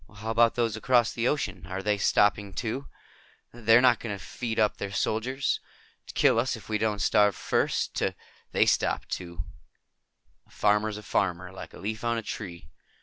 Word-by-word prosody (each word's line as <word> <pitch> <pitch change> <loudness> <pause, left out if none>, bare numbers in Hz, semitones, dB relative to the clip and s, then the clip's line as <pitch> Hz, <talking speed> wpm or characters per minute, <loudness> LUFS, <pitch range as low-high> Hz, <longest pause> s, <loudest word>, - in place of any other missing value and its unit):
"How 110 +2 -4
about 115 0 +4
those 115 -2 0
across 120 +2 +2
the 120 0 0
ocean? 100 - -2
Are 95 +2 -4
they 105 0 +1
stopping, 105 0 +2
too? 125 +4 -3 0.7
They're 115 0 +5
not 125 -2 +5
going 105 -4 -4
to 95 - -12
feed 115 -3 -4
up 105 -1 +2
their 100 - -4
soldiers? 115 +8 0 0.5
To - - -9
kill - - +4
us 125 +2 0
if 110 - -12
we 105 -1 -1
don't 110 -1 0
starve 105 0 +3
first? - - 0
To - - 0 0.2
" - - -31
"They - - +4
stopped, - - +1
too. 85 -1 -5 1.0
A - - -28
farmer 105 +1 +2
is 105 - -5
a 105 - -9
farmer. 90 -3 -1
Like 95 - -10
a - - -10
leaf 110 +4 -4
on 115 0 +1
a 115 - -3
tree. 90 -6 -7
110 Hz, 195 wpm, -27 LUFS, 100-115 Hz, 1.0 s, They're